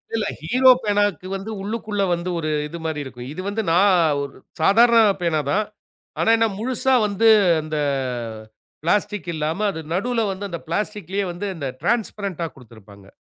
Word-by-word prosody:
இல்ல. 220 - 0 0.2
ஹீரோ 255 +12 +4
பேனாக்கு 205 -4 0
வந்து 195 +3 -6
உள்ளுக்குள்ள 210 -1 -2
வந்து 170 +1 -3
ஒரு 155 -1 -2 0.2
இதுமாரி 160 -1 -4
இருக்கும். 125 -2 -9
இது 185 - -5
வந்து 220 +2 -1
நான் 185 +2 +5 0.2
ஒரு 140 -1 -6 0.3
சாதாரண 230 +7 +6 0.2
பேனா 165 -3 +1
தான். 210 +2 +1 0.5
ஆனா - - +2
என்ன, 225 0 +3
முழுசா 260 +2 0
வந்து 210 +3 +1 0.3
அந்த 155 0 -4 1.1
பிளாஸ்டிக் 205 +2 0
இல்லாம 160 +7 -1
அது 160 - -7
நடுவில 230 +6 0
வந்து 195 +1 -5
அந்த 170 -2 -5
பிளாஸ்டிக்லேயே 200 +1 -2
வந்து 175 +4 -5
இந்த 145 -5 -4
டிரான்ஸ்பரன்ட்டா 200 -6 -1
கொடுத்திருப்பாங்க. 105 -5 -16
195 Hz, 145 wpm, -22 LUFS, 160-210 Hz, 1.1 s, சாதாரண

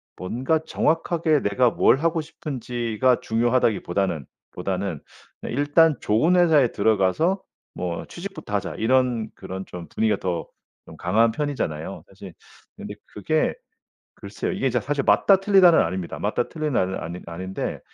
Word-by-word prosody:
뭔가 130 - -1
정확하게 160 -1 +1
내가 120 +5 +2
뭘 130 - +3
하고 165 +2 0
싶은지가 125 -4 -1
중요하다기보다는, 110 - 0 0.3
보다는 90 -3 -3 0.4
일단 145 +3 +3
좋은 155 +13 +2
회사에 155 -8 +4
들어가서 110 - +1 0.3
뭐 85 -2 -4
취직부터 185 - -8
하자 100 -1 -2
이런 120 -1 +1
그런 95 +1 -7
좀 85 -2 -9
분위기가 110 -2 +1
더 85 -3 -3 0.4
좀 - - -11
강한 110 +6 +2
편이잖아요. 115 - -4
사실 - - -12 0.4
근데 105 - -7
그게 155 +10 0 0.6
글쎄요. - - -5
이게 - - 0
진짜 - - 0
사실 - - -1
맞다 195 -1 +4
틀리다는 195 -4 +6
아닙니다. 85 +1 -3
맞다 - - -1
틀리다는 135 - -1
아니 85 +2 -6
아닌데 95 +3 -5
115 Hz, 330 characters per minute, -23 LUFS, 95-155 Hz, 0.6 s, 틀리다는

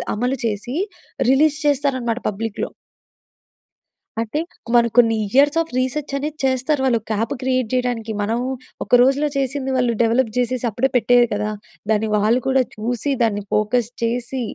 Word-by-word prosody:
అమలు 250 +5 0
చేసి 220 +2 -3 0.6
రిలీజ్ 295 +2 +4
చేస్తారనమాట 260 -5 0
పబ్లిక్‌లో. 215 +1 -4 1.5
అంటే, 230 +7 -2 0.4
మనం 235 0 +5
కొన్ని 230 -2 +6 0.2
ఇయర్స్ 285 +4 +4
ఆఫ్ 330 - -5
రీసర్చ్ 275 +3 -2
అనేది 300 +2 -4
చేస్తారు. 265 +3 +1
వాళ్ళు 245 -3 +3
ఒక్క 220 - -8
యాప్ 225 +3 -1
క్రియేట్ 255 -2 0
చేయడానికి. 245 -3 -1
మనం 225 +3 0 0.4
ఒక - - +3
రోజులో 275 +4 +3
చేసింది 270 0 -1
వాళ్ళు 245 -2 +2
డెవలప్ 230 +1 +2
చేసేసి, 250 0 0
అప్పుడే 235 +5 0
పెట్టేయరు 245 0 +4
కదా! 210 +1 -1 0.4
దాన్ని 220 0 +2
వాళ్ళు 215 +4 +3
కూడా 265 0 +3
చూసి, 240 +5 -2
దాన్ని 210 -3 +1
ఫోకస్ 215 +2 +1
చేసి, 245 +2 -1
245 Hz, 145 wpm, -20 LUFS, 225-265 Hz, 1.5 s, కొన్ని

